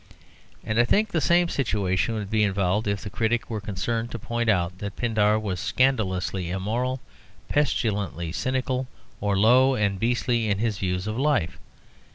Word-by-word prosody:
And 110 +1 -1
I - - +7
think 210 - +2
the 160 - 0
same 175 +4 +4
situation 105 - 0
would 105 -2 -5
be 110 -1 +2
involved 100 +1 +1
if 100 0 -1
the 105 - -5
critic 115 +3 -1
were 110 -2 -3
concerned 115 +4 -2
to 120 - -5
point 115 +1 -2
out 90 -3 +1
that 100 0 -5
Pindar 110 -3 +2
was 100 -4 -3
scandalously 95 -9 0
immoral, 115 +8 -2 0.5
pestilently 105 - 0
cynical, 130 +4 -1 0.3
or 100 -1 0
low 130 +6 +5
and 100 -4 0
beastly 115 0 +1
in 100 - +1
his 110 -1 -1
views 90 0 -1
of 110 +3 -3
life. 135 - +1
110 Hz, 165 wpm, -25 LUFS, 100-120 Hz, 0.5 s, I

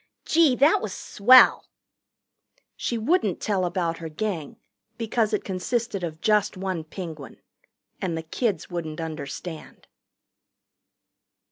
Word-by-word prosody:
Gee, 315 -5 +4
that 290 +5 +4
was 215 -4 -4
swell!" 250 +5 +5 1.1
She 235 - -2
wouldn't 230 - +1
tell 195 -4 0
about 175 -2 -2
her 165 -1 -6
Gang, 165 -2 -4 0.4
because 225 -1 0
it 210 - -1
consisted 200 +2 -2
of 160 -1 -5
just 210 -3 +2
one 185 -3 -3
Penguin. 155 - -8 0.6
And 170 -3 -2
the 160 - -4
kids 205 +5 -2
wouldn't 165 -3 -5
understand. 160 +1 -7
185 Hz, 115 wpm, -25 LUFS, 165-220 Hz, 1.1 s, swell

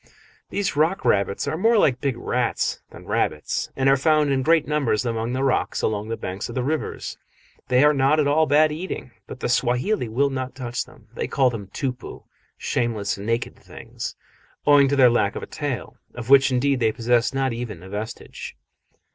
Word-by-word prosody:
These 200 -5 -1
rock 160 +6 +1
rabbits 100 0 +1
are - - -1
more 225 +3 +4
like 130 -11 +3
big 135 -4 -1
rats 120 0 -1
than - - -13
rabbits, 75 - -1
and 135 0 +1
are 135 - +6
found 150 +1 +2
in 135 -1 +1
great 160 +3 +3
numbers 130 -7 0
among 115 0 -2
the 130 +1 -1
rocks 135 - 0
along 105 0 -1
the 115 - -2
banks 95 +4 -5
of 120 - -7
the 125 - 0
rivers. 155 +4 -3 0.5
They 125 +2 +4
are 150 0 +6
not 140 +2 +3
at 150 - +3
all 155 +2 +3
bad 150 +2 +4
eating, 155 -5 -5 0.2
but 130 - -9
the - - 0
Swahili 125 - +1
will 140 +5 +1
not 130 -1 -4
touch 120 -2 -4
them. 110 - -19
They - - -3
call 130 -2 +2
them 105 -4 -6
tupu 125 +4 -5 0.3
(shameless, 110 -5 -1
naked 115 +3 -2
things), - - -8 0.5
owing 145 -1 +6
to 140 - +1
their 130 -3 +6
lack 105 -4 +1
of - - -5
a - - -4
tail, 140 - -5 0.2
of 120 +1 -5
which 135 0 +7
indeed 135 +1 +1
they 110 -2 +2
possess 120 +1 +1
not 135 -2 0
even 115 -7 -6
a 95 - -11
vestige. 105 +3 -7
130 Hz, 195 wpm, -23 LUFS, 115-145 Hz, 0.5 s, which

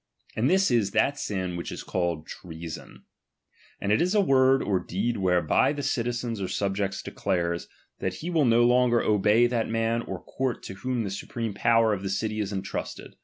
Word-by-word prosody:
And 120 +5 +2
this 190 -4 +3
is 110 -5 +2
that 135 +6 +2
sm 95 -3 -3
which 85 - -5
is - - -6
called 85 -4 -2
iremon; 80 -2 -9 0.8
and 100 - -1
it 105 - +3
is 180 +4 +1
a - - +5
word 135 -6 +4
or 95 -3 +1
deed 100 +7 -2
whereby 90 - +2
the 145 -1 -5
citizen 120 -4 -2
or 95 - -1
subject 95 -1 -2
declares, 85 -1 -2 0.3
that 95 -1 -2
he 170 - -5
will 160 -4 +3
no 120 0 +4
longer 120 -1 +4
obey 105 +3 +4
that 120 -2 0
man 115 +1 0
or 95 -5 -7
court 130 -2 -3
to - - -7
whom 120 +5 -2
the 100 - -4
supreme 115 +2 -4
power 115 +1 +3
of 100 - -3
the 100 - -3
city 110 +2 -2
is 105 -1 -2
entrusted. 95 -1 -5
110 Hz, 190 wpm, -26 LUFS, 95-120 Hz, 0.8 s, a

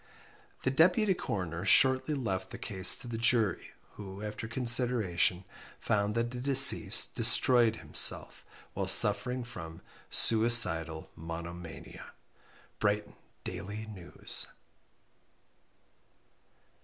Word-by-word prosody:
The 130 - -3
Deputy 180 +8 0
Coroner 90 - -8
shortly 130 +7 0
left 95 -9 -7
the - - -12
case 95 -4 +1
to 125 - -12
the 115 -1 -8
jury, 115 -5 -3 0.2
who, 100 0 -12
after 105 +1 -9
consideration, 115 -7 -2 0.3
found 105 +1 -4
that 115 0 -5
the 125 - -10
deceased 125 -5 +6
destroyed 115 0 0
himself - - -1 0.3
while - - -7
suffering 125 0 +2
from 80 -9 -13 0.3
"suicidal 90 -9 +3
monomania." 85 +1 -12 0.7
_Brighton 105 0 -4 0.3
Daily 105 +3 -10
News. 95 -5 -6
110 Hz, 95 wpm, -27 LUFS, 95-125 Hz, 0.7 s, deceased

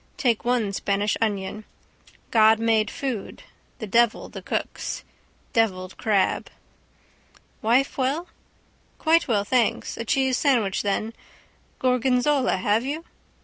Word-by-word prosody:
Take 235 -4 +1
one 235 -5 0
Spanish 200 +1 0
onion. 205 -1 -2 0.7
God 220 -1 +6
made 225 -2 +2
food, 255 -7 -5 0.3
the 220 - -5
devil 230 +2 +2
the - - -8
cooks. - - -4 0.5
Devilled 185 -5 0
crab. 205 -3 0 1.1
—Wife 250 +6 +2
well? 275 +7 0 0.7
—Quite 330 +1 +3
well, 210 -5 +2
thanks... 235 +1 0
A - - -3
cheese 265 +2 +1
sandwich, 230 -9 +2
then. 215 +2 -1 0.6
Gorgonzola, 255 +1 +2
have 210 +4 +1
you? 300 +5 -4
225 Hz, 110 wpm, -24 LUFS, 210-255 Hz, 1.1 s, God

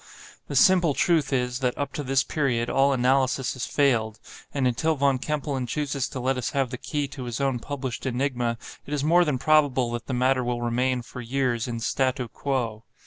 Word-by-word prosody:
The - - -5
simple 180 -6 +5
truth 160 -5 +2
is, 125 -1 0
that 125 -2 -1
up 145 -1 -3
to - - -3
this 135 0 +1
period 120 -6 -1
all 135 +1 +3
analysis 130 0 +2
has 130 - -4
failed; 115 -7 +1 0.3
and 135 -3 +1
until 155 +6 +1
Von 140 -2 +2
Kempelen 140 -3 -2
chooses 140 0 -2
to 130 - -5
let 130 +1 0
us 125 - -2
have 135 -3 +1
the 125 - -5
key 145 -1 -2
to 135 -2 -7
his 120 -2 -4
own 135 -3 0
published 130 -1 -5
enigma, 125 -2 -1 0.3
it 150 - -2
is 140 - -2
more 170 +4 +5
than 150 -5 0
probable 135 -4 +3
that 120 0 -5
the 130 - -2
matter 130 +1 +2
will 120 0 -2
remain, 125 +1 0
for 125 - -9
years, 120 -1 -1
in 115 -1 -3
statu 130 +1 0
quo. 115 -4 -2
130 Hz, 200 wpm, -25 LUFS, 125-140 Hz, 0.3 s, simple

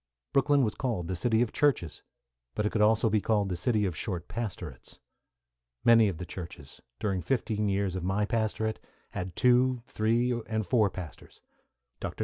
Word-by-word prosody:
Brooklyn 140 0 +4
was 110 - 0
called 115 -10 -2
the 95 - -2
city 110 +6 +2
of 120 - -4
churches, 135 - +1 0.5
but 105 - 0
it 105 - +1
could 110 - 0
also 110 +2 +4
be 110 -1 +2
called 105 -2 +1
the 90 - -1
city 105 +4 +1
of 90 -4 -2
short 90 -1 -4
pastorates. 90 - -6 0.9
Many 115 -2 +6
of 90 - -5
the 90 - -6
churches, 85 -6 -9 0.2
during 95 -3 -1
fifteen 105 +1 0
years 100 -2 0
of 95 - -3
my 95 +3 +1
pastorate, 110 -1 -1 0.3
had 90 0 -5
two, 125 0 +3
three, 115 +3 +1 0.2
and 110 -2 -1
four 110 -4 +3
pastors. 90 -5 -10 0.6
Dr. - - -5
105 Hz, 170 wpm, -29 LUFS, 95-115 Hz, 0.9 s, Many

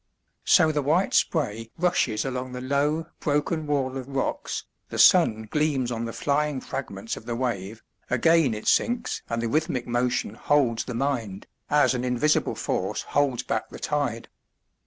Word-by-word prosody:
So 160 -4 +5
the 150 -1 0
white 160 +7 +1
spray 115 - 0
rushes 165 -11 +1
along 130 -1 -4
the 125 - -5
low 145 +4 0
broken 150 +1 -1
wall 135 -3 0
of 130 -1 -6
rocks, 135 -1 -2 0.3
the - - -5
sun 110 0 +5
gleams 145 -5 +1
on 115 0 -2
the 115 - -4
flying 145 +2 0
fragments 115 -5 -5
of 115 - -11
the 120 - -2
wave, 110 -4 -3 0.3
again 140 0 +3
it 105 - -7
sinks 240 0 +1
and 115 0 -2
the - - 0
rhythmic 150 -1 0
motion 120 -3 0
holds 120 -2 +1
the 125 - -5
mind, 115 -7 -2 0.2
as 145 -2 +4
an 125 -1 -2
invisible 125 +5 +1
force - - -2
holds 140 -4 +2
back 110 - -2
the - - -9
tide. 140 -6 -2
130 Hz, 160 wpm, -25 LUFS, 115-150 Hz, 0.3 s, So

